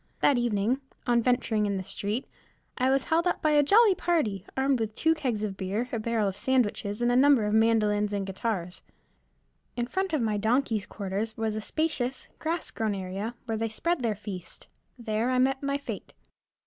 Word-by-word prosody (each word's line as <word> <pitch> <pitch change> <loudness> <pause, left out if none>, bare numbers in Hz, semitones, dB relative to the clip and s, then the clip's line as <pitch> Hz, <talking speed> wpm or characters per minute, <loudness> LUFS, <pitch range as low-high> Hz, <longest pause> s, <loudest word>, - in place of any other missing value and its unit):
That 275 -4 +4
evening, 240 +2 +1 0.2
on 240 -2 +3
venturing 230 -3 +1
in 200 -1 -1
the 190 - -3
street, 205 +5 -3 0.5
I 255 0 +1
was 270 0 +2
held 335 +2 +1
up 355 - 0
by 310 - +2
a 295 -1 +6
jolly 410 +8 +6
party, 310 - 0
armed 265 -1 +2
with 220 -1 -3
two 320 0 +3
kegs 255 -9 -2
of 200 -2 -2
beer, 205 +6 -2
a 230 - -1
barrel 220 -1 0
of 195 - -2
sandwiches, 215 -2 0
and 240 - +3
a - - +2
number 265 -3 +5
of 210 - 0
mandolins 210 -2 +3
and 200 -1 -2
guitars. 190 -2 -3 1.0
In 240 - 0
front 380 +9 -2
of 310 - +1
my 215 -2 0
donkey's 220 -2 +1
quarters 205 +2 -4
was 220 -1 -1
a 215 - -3
spacious, 265 -2 -2
grass 325 +1 -2
grown 215 -2 -1
area, 195 +5 -4
where 225 -2 -2
they 225 0 -1
spread 335 +8 0
their 225 -3 0
feast; 185 -4 -8 0.3
there 225 0 -1
I 255 - +1
met 265 +1 +2
my 280 0 0
fête. 285 - -7
230 Hz, 195 wpm, -28 LUFS, 210-270 Hz, 1.0 s, a